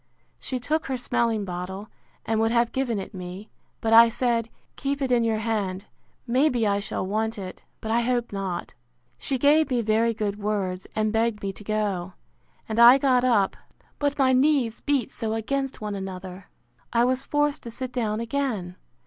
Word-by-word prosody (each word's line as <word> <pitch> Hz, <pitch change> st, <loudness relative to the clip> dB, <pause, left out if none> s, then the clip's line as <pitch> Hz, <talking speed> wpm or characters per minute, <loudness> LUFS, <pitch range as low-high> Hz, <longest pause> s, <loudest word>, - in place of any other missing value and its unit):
She 260 Hz, -, -3 dB
took 310 Hz, +5 st, -1 dB
her 265 Hz, -1 st, -1 dB
smelling 230 Hz, -3 st, 0 dB
bottle, 185 Hz, +3 st, -5 dB, 0.4 s
and 225 Hz, -1 st, 0 dB
would 225 Hz, 0 st, +3 dB
have 235 Hz, 0 st, +2 dB
given 255 Hz, -4 st, -1 dB
it 195 Hz, -, -6 dB
me: 185 Hz, +3 st, -8 dB, 0.3 s
but 225 Hz, 0 st, +1 dB
I 230 Hz, +1 st, +9 dB
said, 235 Hz, -1 st, 0 dB, 0.3 s
Keep 280 Hz, 0 st, -2 dB
it 265 Hz, -2 st, -1 dB
in 240 Hz, -1 st, +4 dB
your 225 Hz, -1 st, +1 dB
hand; 205 Hz, -3 st, -2 dB, 0.4 s
may 260 Hz, +5 st, +3 dB
be 240 Hz, -4 st, 0 dB
I 200 Hz, -1 st, +2 dB
shall 200 Hz, -1 st, -3 dB
want 220 Hz, +3 st, -1 dB
it: 185 Hz, -2 st, -7 dB, 0.2 s
but 220 Hz, -, -3 dB
I 235 Hz, +1 st, +3 dB
hope 240 Hz, 0 st, 0 dB
not. 190 Hz, -3 st, -4 dB, 0.5 s
She 270 Hz, -, -1 dB
gave 295 Hz, +4 st, +4 dB
me 245 Hz, -3 st, +1 dB
very 225 Hz, +2 st, +2 dB
good 210 Hz, -2 st, -2 dB
words, 195 Hz, -3 st, -2 dB
and 215 Hz, 0 st, 0 dB
begged 225 Hz, -2 st, 0 dB
me 195 Hz, -1 st, -2 dB
to 210 Hz, -, -12 dB
go: 200 Hz, -4 st, -2 dB, 0.5 s
And 220 Hz, +1 st, -2 dB
I 240 Hz, +3 st, +9 dB
got 260 Hz, -2 st, +3 dB
up; 225 Hz, -6 st, +3 dB, 0.4 s
but 285 Hz, -1 st, 0 dB
my 260 Hz, -2 st, +4 dB
knees 255 Hz, -4 st, +2 dB
beat 280 Hz, -3 st, 0 dB
so 220 Hz, -2 st, -2 dB
against 270 Hz, +4 st, -2 dB
one 210 Hz, -1 st, -3 dB
another, 190 Hz, -1 st, -7 dB, 0.5 s
I 235 Hz, 0 st, +3 dB
was 255 Hz, +1 st, +1 dB
forced 295 Hz, 0 st, 0 dB
to 235 Hz, -, -8 dB
sit 255 Hz, +2 st, -5 dB
down 220 Hz, -3 st, -1 dB
again. 230 Hz, -7 st, -2 dB
225 Hz, 185 wpm, -25 LUFS, 205-255 Hz, 0.5 s, I